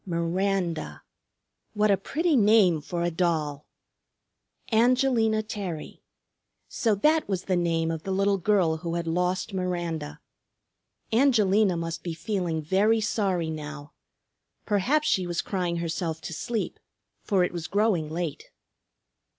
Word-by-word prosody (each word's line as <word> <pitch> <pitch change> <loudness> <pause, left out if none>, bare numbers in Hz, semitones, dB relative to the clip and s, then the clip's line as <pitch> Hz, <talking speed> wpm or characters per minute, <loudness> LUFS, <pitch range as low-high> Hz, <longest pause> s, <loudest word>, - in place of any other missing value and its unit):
Miranda; 170 - -2 0.7
what 210 0 +3
a - - +5
pretty 310 - 0
name 205 - +5
for 170 +3 -3
a 175 - 0
doll! 160 -4 -1 1.0
Angelina 230 -2 +3
Terry; 195 -7 -6 0.7
so 225 -3 0
that 305 +8 +2
was 185 -2 -1
the 185 - 0
name 165 -2 0
of 160 -1 -4
the 195 - -7
little 195 +1 +2
girl 180 -4 +2
who 170 +1 -4
had 170 -1 -2
lost 180 +5 -1
Miranda. 175 -5 -3 0.9
Angelina 215 -7 +3
must 165 0 -4
be 170 -2 -5
feeling 175 -5 -2
very 205 +7 +3
sorry 195 -6 0
now. 150 -1 -7 0.7
Perhaps 260 +10 +1
she 185 -2 +1
was 170 -1 -2
crying 180 -3 -2
herself 165 -1 -3
to 170 - -6
sleep, 225 +6 -3 0.4
for 195 -4 +2
it 180 - -1
was 170 -1 -4
growing 200 -6 +1
late. 165 -2 -4
180 Hz, 130 wpm, -26 LUFS, 165-210 Hz, 1.0 s, a